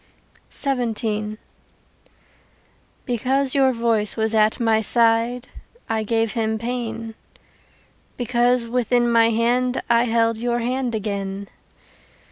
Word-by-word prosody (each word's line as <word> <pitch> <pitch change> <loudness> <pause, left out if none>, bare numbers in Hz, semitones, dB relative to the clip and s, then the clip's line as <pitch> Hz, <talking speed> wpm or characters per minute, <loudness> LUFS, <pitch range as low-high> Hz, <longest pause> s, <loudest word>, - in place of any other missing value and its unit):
XVII 220 -5 -1 1.7
Because 260 +2 0
your 270 -2 +4
voice 230 -3 0
was 220 0 0
at 215 +1 +3
my 225 -2 +2
side 235 +2 +2 0.4
I 220 -1 -1
gave 225 0 0
him 220 -2 -1
pain, 230 -1 -4 1.0
Because 245 0 +1
within 240 0 +1
my 230 -1 +5
hand 245 +3 +1
I 235 +1 +4
held 230 -1 +1
Your 240 0 0
hand 245 0 -2
again. 200 -2 -4
230 Hz, 100 wpm, -22 LUFS, 220-245 Hz, 1.7 s, my